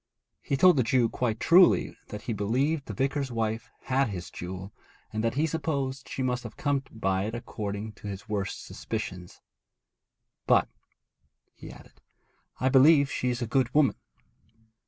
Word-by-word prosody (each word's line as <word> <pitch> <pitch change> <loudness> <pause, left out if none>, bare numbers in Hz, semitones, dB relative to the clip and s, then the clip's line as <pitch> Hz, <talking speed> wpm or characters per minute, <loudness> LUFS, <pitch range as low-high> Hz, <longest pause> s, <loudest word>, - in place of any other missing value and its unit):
He 140 - -1
told 180 +2 +6
the 130 - +4
Jew 115 0 +2
quite 115 -2 -1
truly 180 +1 +5
that 105 - -8
he 115 - -2
believed 135 +9 0
the - - -5
vicar's 135 0 -1
wife 110 -1 -2
had 135 -1 +1
his 90 -4 -6
jewel, 95 +3 -7 0.4
and 110 0 -2
that 115 +1 0
he 150 +3 +2
supposed 140 -4 -2
she 130 - -3
must 125 -1 0
have 115 - -10
come 145 -2 0
by 95 -3 -1
it 110 +2 -4
according 105 -2 -5
to - - -7
his 100 +2 -7
worst 100 -2 -3
suspicions. 90 -5 -6 1.1
'But,' - - +4 0.8
he - - -11
added, - - -16 0.6
'I 130 - +2
believe 140 +2 +6
she 125 - -1
is 120 0 -2
a - - 0
good 125 +2 +1
woman.' 150 -3 +4
120 Hz, 160 wpm, -28 LUFS, 105-135 Hz, 1.1 s, told